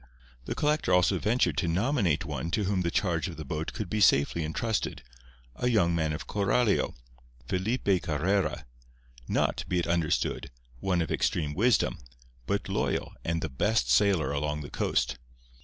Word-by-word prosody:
The - - -3
collector 150 -8 +1
also 90 +1 +4
ventured 100 - +1
to 85 - +1
nominate 95 - +1
one 85 - -4
to 105 - 0
whom 95 -1 0
the 85 - 0
charge 85 -2 0
of 85 - -7
the 80 - -6
boat 75 +3 -3
could 105 - -5
be 105 +4 -1
safely 75 -1 +4
intrusted—a 65 - -4
young 90 -8 +3
man 80 -2 0
of 75 - -4
Coralio, 105 +2 +1 0.5
Felipe 95 -1 0
Carrera—not, 60 -8 -2
be 90 - 0
it 85 - +1
understood, 85 -4 0 0.3
one 90 +2 +1
of 80 - -6
extreme 75 -3 0
wisdom, 115 +4 +2 0.5
but - - -1
loyal - - -1
and 85 0 -1
the - - 0
best 105 - +1
sailor 95 -9 +3
along 75 +1 -2
the 70 - -8
coast. 60 - 0
85 Hz, 155 wpm, -28 LUFS, 75-100 Hz, 0.5 s, also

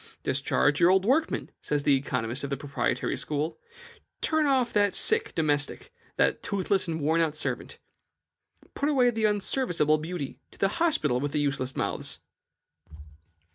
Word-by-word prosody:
"Discharge 145 +2 +1
your 175 0 +6
old 190 +1 +3
workman," 300 +8 +1
says 145 -1 -1
the 140 - +4
economist 130 -2 -2
of 140 - -3
the 140 - -2
proprietary 145 0 -2
school; 150 +1 -3 0.6
"turn 315 -1 +1
off 260 -4 +2
that 205 -2 +2
sick 445 -1 +3
domestic, 145 -3 0 0.2
that - - +2
toothless 195 -1 -1
and 160 -1 -2
worn 160 +3 +2
out 155 -2 0
servant. - - -4 1.0
Put 285 - -1
away 255 -4 +4
the 220 -1 0
unserviceable 195 - +1
beauty; 155 -3 -5
to - - -17
the 195 - +2
hospital 150 - +2
with 145 +1 -3
the 150 - +1
useless 140 -3 -1
mouths!" - - 0
160 Hz, 150 wpm, -27 LUFS, 145-220 Hz, 1.0 s, your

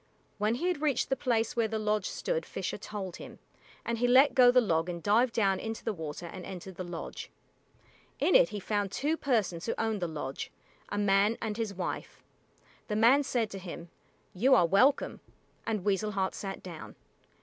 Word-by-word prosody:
When 210 +2 +1
he 300 - -3
had 355 -5 -1
reached 295 -4 +1
the - - +4
place 235 -4 0
where 230 -2 +2
the 220 0 -2
lodge 210 -2 0
stood - - -2
Fisher - - -4
told 195 -4 -6
him, - - -10 0.5
and 230 -1 -2
he 245 - +2
let 265 +4 +6
go 250 -2 +7
the 250 +1 +6
log 170 -7 +1
and 170 -1 -5
dived 230 +4 +3
down 195 -4 +2
into 225 0 -5
the 225 - 0
water 160 -1 -6
and 180 +2 -8
entered 190 +1 -8
the 185 - -6
lodge. 175 -2 -7 0.9
In - - +2
it - - +6
he 205 - -5
found 205 0 -1
two 295 +9 0
persons 215 - -1
who - - 0
owned 220 -3 -1
the 175 - 0
lodge, 145 -4 -5 0.4
a 205 - -3
man 205 +2 +3
and 220 -2 -3
his 220 -3 -3
wife. 180 -1 -5 0.6
The 210 - -2
man 235 +6 +5
said 240 -6 -1
to 195 - -6
him, 170 -2 -8 0.4
"You 255 +8 +4
are 180 - +5
welcome," 255 - +3 0.5
and 215 -4 -2
Weasel 210 +1 0
Heart 190 -1 0
sat 195 -1 -6
down. 170 -4 -9
210 Hz, 195 wpm, -30 LUFS, 185-235 Hz, 0.9 s, go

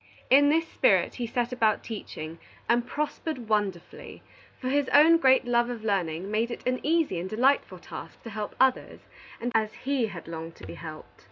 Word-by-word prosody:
In 285 +2 +7
this 325 +2 +2
spirit - - +2
he 240 -2 -4
set 240 +1 -1
about 225 -4 +1
teaching, 165 -7 -7 0.3
and 240 +1 +2
prospered 300 -3 -4
wonderfully, 205 -5 -3 0.4
for 255 - -4
his 280 0 +1
own 315 +3 +7
great 265 -4 +4
love 240 0 +2
of 235 -3 -6
learning 190 -3 -1
made 225 +2 +1
it 235 - -7
an 255 0 +1
easy 315 - +1
and 180 +2 -5
delightful 255 +7 +2
task - - -10
to 230 - -8
help 210 0 -5
others 265 -1 +1 0.5
as 215 -1 +1
he 270 -4 +1
had 175 -6 -9
longed 165 0 -7
to - - -12
be - - -8
helped. 160 -2 -10
235 Hz, 180 wpm, -27 LUFS, 200-265 Hz, 0.5 s, In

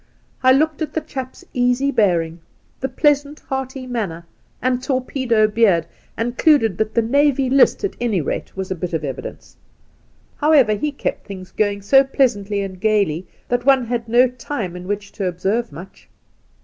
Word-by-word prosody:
I 260 - +5
looked 310 +4 +2
at 315 - -3
the 320 - -1
chap's 260 -3 -7
easy 250 +3 +1
bearing, 175 -8 +1 0.4
the 265 - -2
pleasant, 290 +2 +1
hearty 265 -1 -5
manner 200 -10 -4 0.3
and 255 0 0
torpedo 255 -4 +1
beard, 210 -7 +3 0.3
and 240 +2 -2
concluded 245 - +3
that 220 0 -1
the 230 - +3
Navy 275 +1 +2
List, 275 +9 +4
at 400 - -2
any 225 -6 +1
rate, 155 - -4
was 190 -1 -4
a - - 0
bit 175 0 -5
of 160 -2 -1
evidence. 135 -2 -7 0.8
However, 290 -8 +4
he 295 +8 -2
kept 280 - -4
things 190 -2 -9
going 205 -2 -1
so 270 +6 +6
pleasantly 210 -7 0
and 185 -2 -6
gaily 200 -6 +1 0.2
that 245 0 0
one 265 -1 +4
had 230 -1 -3
no 245 +2 +5
time 240 -6 -5
in 180 0 -8
which 205 0 -4
to 195 - -3
observe 195 +7 -1
much. 185 +3 -12
235 Hz, 170 wpm, -20 LUFS, 195-265 Hz, 0.8 s, so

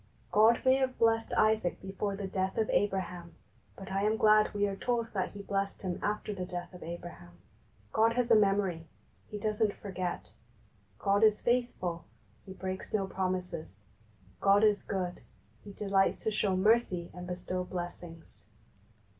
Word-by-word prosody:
God 220 +2 +5
may 260 0 +6
have 260 -1 -1
blessed 225 0 +2
Isaac 215 -4 +2
before 195 +1 -3
the 200 0 -5
death 190 +1 -2
of 220 -1 +1
Abraham, 180 -4 -1 0.4
but 190 0 -9
I 195 +1 0
am 215 +2 +2
glad 215 0 +5
we 205 0 +1
are 200 -1 -2
told 230 +2 -2
that 190 -3 -2
He 200 0 -8
blessed 195 0 -2
him 180 -2 -3
after 210 0 -2
the 185 -2 -4
death 180 0 -6
of 180 - -11
Abraham. 170 - -8 0.6
God 225 +1 +4
has 245 0 0
a - - +9
memory; 195 -5 +2 0.4
He 210 - -6
doesn't 210 0 0
forget. 185 -3 -4 0.7
God 200 - +2
is 215 -1 +5
faithful; 235 -9 -1 0.4
He 190 - -7
breaks 190 0 -5
no 200 -2 +1
promises. 180 - -4 0.6
God 200 +1 +4
is 210 -1 +4
good; 180 -3 -3 0.4
He 205 - -9
delights 195 -1 +1
to 220 - +1
show 205 -2 +1
mercy 190 -3 +2
and 180 0 -8
bestow 180 0 -3
blessings. 175 -2 -8
195 Hz, 160 wpm, -31 LUFS, 180-215 Hz, 0.7 s, a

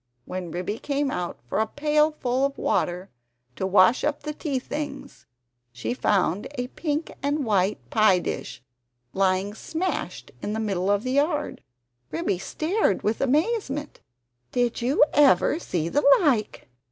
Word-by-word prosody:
When 180 -1 -5
Ribby 180 +6 -4
came 285 -1 -1
out 180 -5 -3
for 125 - -1
a 220 - +2
pailful 300 -2 +1
of 275 0 0
water 180 0 -1 0.4
to 190 - -2
wash 190 +5 +5
up 295 0 -1
the 300 - -4
tea 290 -3 -2
things, 290 +3 -6 0.4
she 115 - -3
found 195 -5 +1
a 250 -1 -3
pink 305 +1 -3
and 285 0 0
white 200 -2 0
pie 215 -4 +5
dish 130 -7 -5 0.5
lying 190 +1 +1
smashed 330 - -4
in 210 - -3
the 220 - -2
middle 195 -3 -1
of 205 +1 +2
the 255 - -2
yard. 295 +2 0 0.5
Ribby 170 +4 -1
stared 315 - 0
with 215 +2 0
amazement 295 - 0 0.5
"Did 245 -1 0
you 255 +5 +4
ever 295 +2 +4
see 170 - -2
the 290 +12 +1 0.2
like! 255 - 0
245 Hz, 145 wpm, -25 LUFS, 190-295 Hz, 0.5 s, wash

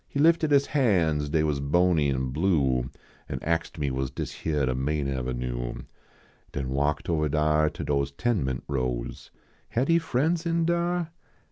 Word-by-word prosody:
lie 140 - +2
lifted 165 -1 +4
his 140 -1 +4
han 90 - +2
s, 75 - -4
dav 80 +1 +2
was 75 -2 0
bony 80 +1 +2
an, 65 -1 -1
blue, 70 -6 +1 0.4
An - - -3
axed 85 +1 -1
me 70 -3 -1
was 65 0 -2
dis - - -5
hyar 75 -4 0
de 65 - 0
main 70 +3 -1
avenue, 60 -2 -3 0.7
Den 70 -3 -3
walked 70 +3 0
ovali 75 -3 0
dnr 75 +1 +2
To - - -6
dose 70 -1 0
ten 105 - 0
ment 65 -1 -3
rows. 65 -3 -3 0.4
Had 130 +6 0
he 165 0 +5
friends 160 +2 0
in 165 -1 +1
dar 170 0 0
75 Hz, 170 wpm, -27 LUFS, -, 0.7 s, he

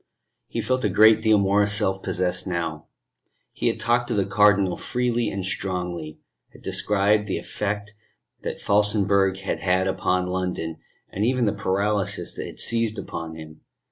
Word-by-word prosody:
He - - -3
felt 130 0 -1
a 105 - +2
great 110 +3 +6
deal 110 -1 +4
more 100 +1 +3
self 100 -2 +2
possessed 90 0 -1
now. 85 -3 -3 0.6
He - - -2
had - - 0
talked 120 +1 +1
to - - -1
the 100 -2 +1
Cardinal 100 -2 +3
freely 120 -2 -1
and 100 -2 -4
strongly, 90 -5 -4 0.3
had - - -17
described 105 +1 +1
the 95 - -1
effect 105 0 -4 0.5
that - - -5
Felsenburgh 100 -2 +2
had 95 - -3
had 95 0 +1
upon 90 -1 0
London, 90 -3 -3 0.3
and 100 - -2
even 125 +1 +2
the 105 - +1
paralysis 100 0 -1
that - - -5
had - - -11
seized 115 -1 +2
upon 80 -1 -6
himself. 80 -1 -11
100 Hz, 160 wpm, -24 LUFS, 90-105 Hz, 0.6 s, great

